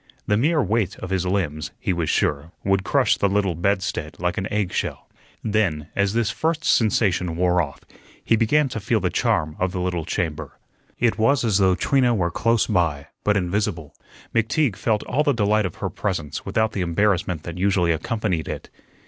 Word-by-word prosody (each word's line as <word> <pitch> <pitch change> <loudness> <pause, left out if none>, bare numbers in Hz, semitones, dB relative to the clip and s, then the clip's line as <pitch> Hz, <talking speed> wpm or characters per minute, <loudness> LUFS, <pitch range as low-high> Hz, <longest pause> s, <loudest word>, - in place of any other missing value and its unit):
The 105 - +2
mere 150 +6 +2
weight 105 -1 0
of 95 - -7
his 95 -1 0
limbs, 80 -6 -1
he - - 0
was 85 -3 -1
sure, 75 +3 0
would 95 -1 +1
crush - - +2
the 100 - +2
little 100 -2 +1
bed 95 +4 0
stead 75 -4 -4
like 90 0 -1
an 95 - -4
eggshell. 105 -4 -2 0.4
Then, 95 -9 0
as 100 0 +1
this 115 -1 +1
first 160 +4 -1
sensation 95 -6 +2
wore 90 +1 +2
off, 70 -3 -6 0.4
he 115 - +3
began 135 +7 +3
to 115 - -4
feel 100 - +1
the - - -1
charm 75 0 0
of 95 0 0
the 95 - -2
little 90 -2 -1
chamber. 80 -3 -3 0.4
It 120 -2 +1
was 125 +3 +3
as 105 -3 +2
though 95 -1 +4
Trina 125 +5 +2
were 85 -4 0
close 115 +5 +2
by, 80 -8 0
but 105 -1 +2
invisible. 90 -4 -2 0.4
McTeague 115 +1 +1
felt 105 +2 0
all 145 - 0
the 145 -2 +2
delight 105 -2 +2
of 85 - -10
her - - -3
presence 75 -1 -3
without 110 0 +1
the 100 - -3
embarrassment 90 -2 0
that 85 +1 -7
usually 95 -3 +2
accompanied 90 0 -1
it. - - -6
95 Hz, 190 wpm, -23 LUFS, 85-110 Hz, 0.4 s, though